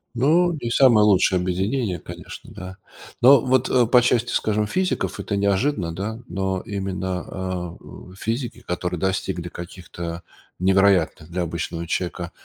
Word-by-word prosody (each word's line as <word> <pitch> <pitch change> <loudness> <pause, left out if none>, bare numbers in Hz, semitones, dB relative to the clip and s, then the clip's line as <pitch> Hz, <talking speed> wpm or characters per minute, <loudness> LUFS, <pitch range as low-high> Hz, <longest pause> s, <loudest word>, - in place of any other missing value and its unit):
Ну, 165 +8 +3
не 120 -1 -3
самое 115 -5 +6
лучшее 95 -2 +4
объединение, 95 +2 -1
конечно, - - -10
да. 95 +1 -9 0.4
Но 130 +1 +8
вот, 130 0 +2
э, 125 -2 +4
по 120 +2 +5
части, 120 -1 +1
скажем, 105 0 +1
физиков, 185 - -1
это 100 - -2
неожиданно, 100 - 0
да, 110 +6 -4
но 95 -1 -2
именно, 95 -2 -3
а, 95 -2 -4
у 90 - -13
физики, 115 +4 -4
которые 90 -1 -3
достигли 95 -2 -2
каких-то 85 -1 -7 0.3
невероятных 95 -4 +2
для 90 +1 -2
обычного 85 0 -4
человека 85 0 -3
95 Hz, 140 wpm, -23 LUFS, 90-115 Hz, 0.4 s, Но